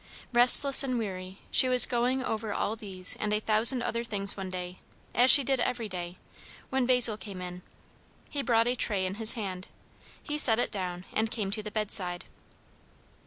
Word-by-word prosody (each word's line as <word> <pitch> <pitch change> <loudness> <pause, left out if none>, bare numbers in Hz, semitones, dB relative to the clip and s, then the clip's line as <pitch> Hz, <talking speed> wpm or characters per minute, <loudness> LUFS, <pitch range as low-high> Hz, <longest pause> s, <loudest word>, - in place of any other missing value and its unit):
Restless 250 +3 +6
and 255 -3 -3
weary, 190 -4 -8
she 255 - +4
was 250 -1 +6
going 250 +2 -3
over 220 -3 -5
all 215 - -4
these 190 -4 -3
and 210 - -5
a 210 - -1
thousand 225 +4 +5
other 235 +1 -4
things 200 -3 -2
one 195 -2 -8
day, 180 0 -8 0.3
as 250 +2 +2
she 280 - +9
did 265 0 -2
every 235 -2 -4
day, 180 -2 -9 0.5
when 265 -2 -2
Basil 245 -4 +2
came 200 -4 -10
in. 180 0 -9 0.7
He 285 - -4
brought 230 -4 0
a 245 - -1
tray 200 -6 -2
in 185 - -5
his 220 - +4
hand. 190 -5 -8 0.6
He 295 0 -4
set 225 -6 +7
it 245 - -3
down, 180 -3 -7
and 220 +1 -2
came 210 -4 -5
to 215 +1 -2
the 210 - -9
bedside. 195 -4 -3
215 Hz, 185 wpm, -26 LUFS, 190-245 Hz, 0.7 s, she